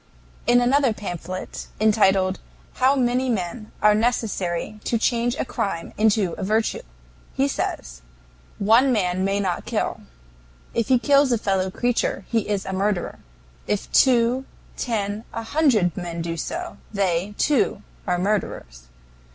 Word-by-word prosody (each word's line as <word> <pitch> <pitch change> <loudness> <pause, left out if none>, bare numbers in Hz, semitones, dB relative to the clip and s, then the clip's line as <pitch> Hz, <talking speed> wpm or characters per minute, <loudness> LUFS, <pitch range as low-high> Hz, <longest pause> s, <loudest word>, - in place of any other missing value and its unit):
In 240 +1 +6
another 260 0 +3
pamphlet, 185 -3 -6
entitled 195 -3 +3 0.4
"How 260 +2 +4
many 255 0 +1
Men 215 +1 -3
are 210 0 +7
Necessary 215 -4 -1
to 235 - 0
Change 235 +1 +1
a - - -1
Crime 180 -8 -3
into 210 -4 +2
a - - -3
Virtue?" 220 +3 0 0.5
he - - +2
says: - - -4 0.6
"One 230 +6 +4
man 185 -5 +1
may 195 +1 +1
not 190 -3 -2
kill. - - -2 0.7
If 230 -2 0
he 260 - +5
kills 280 +2 +4
a 240 - +3
fellow 190 -3 0
creature, 245 +5 -1
he 225 -3 0
is 205 -2 -1
a 190 - -4
murderer. 195 -1 -1 0.5
If 210 -1 -2
two, 250 0 +4 0.3
ten, 210 -3 -2
a 230 - -3
hundred 225 - +2
men 170 -2 -4
do 165 0 -3
so, 345 - -5
they, 195 -1 0
too, 355 +9 +1 0.2
are 180 -1 +1
murderers. 175 - -2
210 Hz, 140 wpm, -23 LUFS, 185-240 Hz, 0.7 s, are